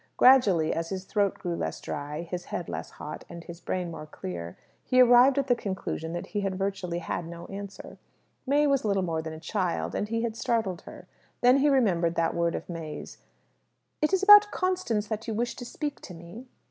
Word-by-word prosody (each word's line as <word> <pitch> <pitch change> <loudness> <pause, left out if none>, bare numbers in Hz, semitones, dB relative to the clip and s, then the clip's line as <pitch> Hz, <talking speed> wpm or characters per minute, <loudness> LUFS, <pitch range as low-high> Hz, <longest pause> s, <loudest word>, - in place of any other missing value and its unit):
Gradually, 200 -12 +5
as 165 0 -3
his 190 -1 -4
throat 200 0 0
grew 175 -1 -3
less - - -3
dry, 150 +3 -5
his 180 +1 -6
head - - -4
less - - -5
hot, - - -8
and 170 - -9
his 170 0 -10
brain 180 -1 -3
more 155 -2 -8
clear, 85 - -7 0.3
he 255 - +2
arrived 250 +2 +7
at 280 - +2
the 255 - +3
conclusion 190 -7 -4
that 175 - -4
he 205 - -3
had 195 -1 -2
virtually 190 -3 -2
had 170 0 -4
no 170 0 -8
answer. 200 0 -8 0.5
May 290 +2 +3
was 275 -2 +2
little 200 -3 +1
more 165 -2 -1
than 160 0 -6
a 160 - -8
child, 185 0 -2
and 210 - -2
he 230 +1 -1
had 230 -2 -2
startled 220 -7 -1
her. - - -11 0.3
Then 250 +2 +6
he 290 +2 +3
remembered 180 -11 +2
that 165 0 +1
word 170 0 0
of - - -6
May's, 160 -3 -7 0.8
"It 305 - +2
is 385 0 +2
about 415 +1 +9
Constance 365 - -1 0.2
you 220 - -2
wish 240 +2 -1
to 245 - -7
speak 290 +3 -5
to 180 - -10
me." 175 +10 -11
195 Hz, 205 wpm, -27 LUFS, 170-245 Hz, 0.8 s, about